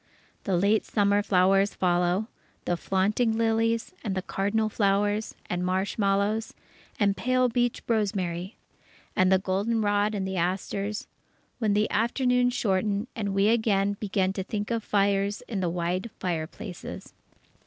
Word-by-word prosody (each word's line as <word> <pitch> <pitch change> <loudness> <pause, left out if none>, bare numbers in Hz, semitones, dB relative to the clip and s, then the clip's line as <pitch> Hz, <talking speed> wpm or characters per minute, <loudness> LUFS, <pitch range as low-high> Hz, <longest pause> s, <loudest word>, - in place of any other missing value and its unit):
The 190 -3 +1
late 205 +4 +3
summer 205 -1 +2
flowers 195 0 +3
follow, 180 +2 +1 0.4
the 175 - +1
flaunting 210 +6 +1
lilies, 225 0 +1
and 195 -4 -2
cardinal 210 +3 0
flowers, 205 0 0
and 180 0 -2
marshmallows, 200 +3 0 0.4
and 200 -1 +3
pale 255 +2 +2
beach 240 0 0
rosemary; 195 -4 -1 0.6
and 185 0 +3
the 190 - +6
goldenrod 205 +2 0
and 190 -2 -2
the 190 0 -3
asters, 195 +4 -2 0.5
when 215 -3 +1
the 210 +1 +3
afternoons 245 +2 +2
shorten 200 +3 0
and 200 -3 -2
we 200 +2 +4
again 205 -3 +2
begin 190 -2 0
to 190 - -3
think 210 +3 -4
of 230 -2 -1
fires 200 0 +1
in 215 -5 -3
the 180 -2 0
wide 180 +5 -2
fireplaces. 175 +2 -5
200 Hz, 130 wpm, -27 LUFS, 190-220 Hz, 0.6 s, the